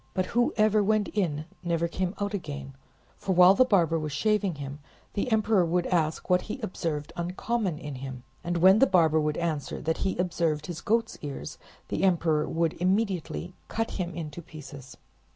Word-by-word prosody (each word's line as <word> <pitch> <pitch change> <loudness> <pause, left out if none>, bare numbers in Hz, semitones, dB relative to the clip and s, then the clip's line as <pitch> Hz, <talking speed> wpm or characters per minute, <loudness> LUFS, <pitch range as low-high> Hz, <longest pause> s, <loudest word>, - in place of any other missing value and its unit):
But 185 - +1
whoever 215 -3 +3
went 210 0 +2
in 155 -7 -1 0.2
never 170 -1 0
came 185 +2 -2
out 205 0 -2
again; 145 -7 -5 0.5
for 190 - -1
while 180 +1 +8
the 230 - +5
barber 170 -9 +3
was 155 -1 -4
shaving 205 +3 +1
him, 140 0 -7 0.3
the 230 +5 -1
emperor 215 -3 +3
would 175 +1 +1
ask 160 -3 0
what 180 0 +3
he 240 - -6
observed 165 -8 -3
uncommon 185 +1 -2
in 150 -1 -6
him, 130 -2 -7 0.2
and 175 0 -1
when 190 +4 +6
the 270 - +6
barber 160 -5 +4
would 150 0 -1
answer 160 -4 -2
that 160 0 -1
he 190 - -1
observed 165 -4 0
his 165 -1 -6
goat's 230 +5 0
ears, 140 - -6 0.3
the - - -1
Emperor 170 -5 +2
would 165 -1 +1
immediately 185 -2 0
cut 225 0 -2
him 175 -3 -4
into 160 -1 -6
pieces. 145 -5 -11
175 Hz, 175 wpm, -28 LUFS, 155-200 Hz, 0.5 s, while